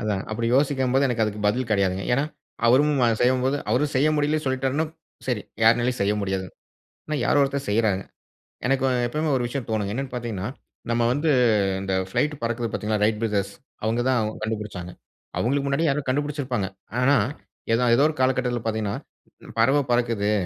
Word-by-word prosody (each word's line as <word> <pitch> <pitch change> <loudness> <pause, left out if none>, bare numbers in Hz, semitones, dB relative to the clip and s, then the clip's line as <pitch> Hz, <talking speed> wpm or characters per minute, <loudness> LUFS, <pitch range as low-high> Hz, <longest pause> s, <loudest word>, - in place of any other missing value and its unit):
அதாங்க 105 -3 -1
அப்படி 115 +1 -1
யோசிக்கும்போது 135 -1 +2
எனக்கு 120 -2 0
அதுக்கு 105 0 -4
பதில் 120 +2 -1
கிடையாதுங்க. 95 -2 +1
ஏன்னா, 140 +3 +1 0.4
அவரும் 145 +5 +5 0.3
செய்யும்போது 130 +2 +2
அவரும் 145 +3 +1
செய்ய 145 +4 +4
முடியலன்னு 150 +1 +1
சொல்லிட்டாருன்னா 135 +4 0 0.4
சரி 120 -5 -1 0.2
யாராலும் 120 +2 +4
செய்ய 100 +1 +2
முடியாதுங்க. 95 -2 -3 0.5
ஆனா, 155 - -2
யாரோ 145 - +4
ஒருத்தர் 140 -2 -2
செய்யறாங்க. 105 -3 +1 0.6
எனக்கு 135 0 +2 0.2
எப்பவுமே 155 +5 -1
ஒரு 120 - -1
விஷயம் 125 0 -4
தோணும். 105 -2 0
என்னன்னு 135 +1 -4
பார்த்தீங்கன்னா, 110 -5 -3 0.4
நாம 115 0 +2
வந்து 150 +4 0 0.5
இந்த 95 -1 -2 0.2
பிளைட் 150 0 +1
பறக்கிறது 115 0 -1
பார்த்தீர்களா 105 0 -1
"ரைட் 110 -1 +1
பிரதர்ஸ்," 100 -2 -1 0.3
அவங்க 115 +2 +1
தான் 110 -4 +1
கண்டுபிடிச்சாங்க. 105 -5 -4 0.5
அவங்களுக்கு 140 +4 +1
முன்னாடி 140 +4 +1
யாரோ 145 +2 +1
கண்டுபிடிச்சிருப்பாங்க. 135 -7 -1 0.3
ஆனா 140 +3 +5 0.6
ஏத 115 - +3 0.2
ஏதோ 140 - +4
ஒரு 155 - -3
காலகட்டத்தில 130 -2 +1
பார்த்தீங்கன்னா, 110 -2 -1 0.6
பறவ 135 +6 +4
பறக்குது. 115 -4 +1
120 Hz, 155 wpm, -24 LUFS, 105-135 Hz, 0.6 s, அவரும்